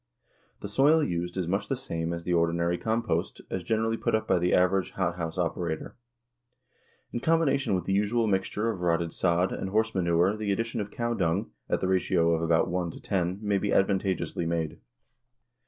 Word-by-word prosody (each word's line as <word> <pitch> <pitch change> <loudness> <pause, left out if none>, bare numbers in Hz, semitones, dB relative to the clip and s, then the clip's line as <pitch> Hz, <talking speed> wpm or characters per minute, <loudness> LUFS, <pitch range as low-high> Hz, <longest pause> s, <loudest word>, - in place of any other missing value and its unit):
The - - -4
soil 145 +9 +4
used 90 -4 -2
is 90 -3 -1
much 100 +4 -1
the 135 - 0
same 85 -10 -3
as 85 0 -4
the 90 - -1
ordinary 85 +1 +1
compost 115 +1 -1
as 95 - -2
generally 110 +3 0
put - - 0
up 110 0 -1
by - - +3
the 90 +1 +1
average 90 +1 +2
hothouse 85 -2 -2
operator. 85 -2 -2 1.2
In - - -1
combination 140 -7 +2
with 90 -2 -2
the 95 - 0
usual 105 +4 +2
mixture 105 +2 0
of 95 -5 -7
rotted 85 -1 0
sod 90 +1 +1
and 95 - -3
horse 110 +3 +1
manure 85 +1 +2
the 105 -2 -2
addition 115 +2 -1
of 105 - -5
cow 120 +2 -2
dung, 95 +1 0 0.2
at - - 0
the 95 - 0
ratio 90 -2 +2
of 80 - 0
about 85 +1 +2
one 90 -1 -1
to - - -9
ten, 90 -2 -1
may 100 -1 +1
be - - -2
advantageously 95 -3 +1
made. 80 -2 -2
95 Hz, 190 wpm, -28 LUFS, 85-110 Hz, 1.2 s, soil